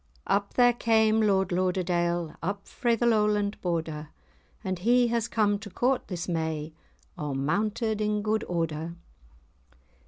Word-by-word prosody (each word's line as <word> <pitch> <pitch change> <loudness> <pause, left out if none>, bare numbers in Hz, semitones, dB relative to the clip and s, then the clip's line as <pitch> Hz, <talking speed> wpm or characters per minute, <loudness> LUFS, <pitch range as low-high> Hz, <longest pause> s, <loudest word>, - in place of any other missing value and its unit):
Up 200 0 0
there 245 -1 +5
came 220 -1 +3
Lord 195 -3 +2
Lauderdale, 175 -2 0
Up 200 +3 -4
frae 240 -3 0
the 240 - 0
Lowland 210 -2 +2
Border, 160 -3 -3 0.5
And 185 -3 -2
he 240 +5 +3
has 235 -1 0
come 205 -3 +1
to 205 0 -9
court 250 +6 0
this 175 -2 -4
may, 160 -2 -2 0.5
A' 145 -2 -3
mounted 215 - 0
in 210 0 0
good 220 +1 0
order. 165 -1 -2
200 Hz, 135 wpm, -27 LUFS, 170-220 Hz, 0.5 s, there